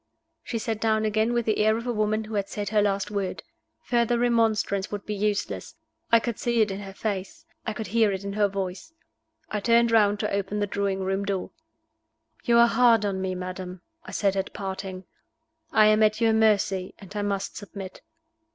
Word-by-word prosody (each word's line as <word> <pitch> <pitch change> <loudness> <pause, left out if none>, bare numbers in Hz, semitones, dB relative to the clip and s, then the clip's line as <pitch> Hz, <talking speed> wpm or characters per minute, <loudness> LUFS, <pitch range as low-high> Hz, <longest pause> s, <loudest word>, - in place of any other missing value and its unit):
She 235 - -4
sat 220 -1 -3
down 220 -1 +2
again 220 +2 +1
with 240 -1 0
the 215 - +1
air 215 +1 +3
of 230 - -6
a 245 - -1
woman 215 0 0
who 215 +1 -9
had 200 -2 -1
said 205 -1 -4
her 210 0 +3
last 200 0 0
word. 200 -2 -3 0.4
Further 240 -1 +1
remonstrance 225 -4 +1
would 205 -1 -5
be 210 - -3
useless; 210 0 -2 0.4
I 230 - +7
could 235 -1 -4
see 235 -1 0
it 210 -2 +2
in 195 - -4
her 195 -1 -8
face; 195 -3 -4 0.2
I 220 - -1
could 220 0 -5
hear 220 +1 +2
it 190 0 -4
in 200 0 -4
her 205 0 +3
voice. 195 - -5 0.6
I 210 - -1
turned 235 +2 +3
round 205 -2 +4
to 210 - -2
open 200 +1 -1
the 205 - +1
drawing 200 -1 -1
room 195 +1 -1
door. 195 -2 -3 0.9
"You 235 -1 +4
are 235 - +8
hard 230 -3 +4
on 195 -2 -1
me, 185 -1 -2
madam," 185 0 -6 0.2
I - - -11
said 195 -2 0
at 195 0 -2
parting. 190 -1 -5 0.7
"I 215 - +5
am 215 0 +5
at 215 0 +3
your 225 -1 +3
mercy, 205 -4 +2
and 195 0 -13
I 205 - -1
must 200 -1 -2
submit." 200 -2 -8
210 Hz, 205 wpm, -26 LUFS, 195-220 Hz, 0.9 s, are